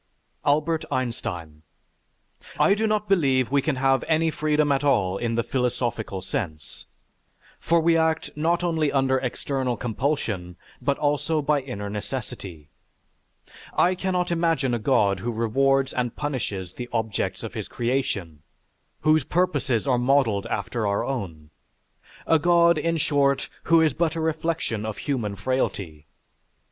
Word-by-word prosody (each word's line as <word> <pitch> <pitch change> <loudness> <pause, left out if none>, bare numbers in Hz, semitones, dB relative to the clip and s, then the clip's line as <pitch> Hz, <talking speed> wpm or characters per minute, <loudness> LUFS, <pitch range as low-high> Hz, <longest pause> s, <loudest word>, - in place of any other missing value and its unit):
ALBERT 155 +3 +2
EINSTEIN 90 - -3 1.0
I 200 - +5
do 220 +2 0
not 210 -1 0
believe 135 -10 +2
we 140 0 +3
can 150 0 0
have 135 0 +2
any 160 0 +2
freedom 150 -1 +1
at 135 0 +1
all 100 -9 +2
in 115 -1 -1
the 115 - +1
philosophical 120 -6 -2
sense, 80 -6 -5 0.7
for 170 0 +2
we 165 +1 +3
act 160 0 +1
not 170 +3 +1
only 160 -4 +1
under 135 -1 +2
external 130 -1 -2
compulsion, 110 - -2 0.3
but 140 -1 0
also 150 +2 0
by 150 -1 +1
inner 125 -6 -6
necessity.... 100 - -6 1.1
I 180 - +4
cannot 180 -1 -1
imagine 165 -7 +1
a 120 - 0
God 105 -5 +2
who 120 +6 -2
rewards 135 +4 +1
and 120 -2 -2
punishes 105 - -3
the 125 +3 -7
objects 110 -4 -2
of - - -6
his - - -5
creation, 110 - -2 0.6
whose 155 -1 +4
purposes 145 -8 0
are 125 -3 +2
modelled 125 -6 +2
after 110 +1 -2
our 100 0 0
own, 85 - -5 0.7
a 160 - +4
God, 170 0 +4
in 165 +1 0
short, 140 -2 +1 0.2
who 165 -1 +5
is 160 -1 +3
but 165 -1 0
a - - -2
reflection 160 -8 -1
of 110 -1 -4
human 115 -8 -2
frailty. 95 - -2
135 Hz, 140 wpm, -25 LUFS, 110-155 Hz, 1.1 s, I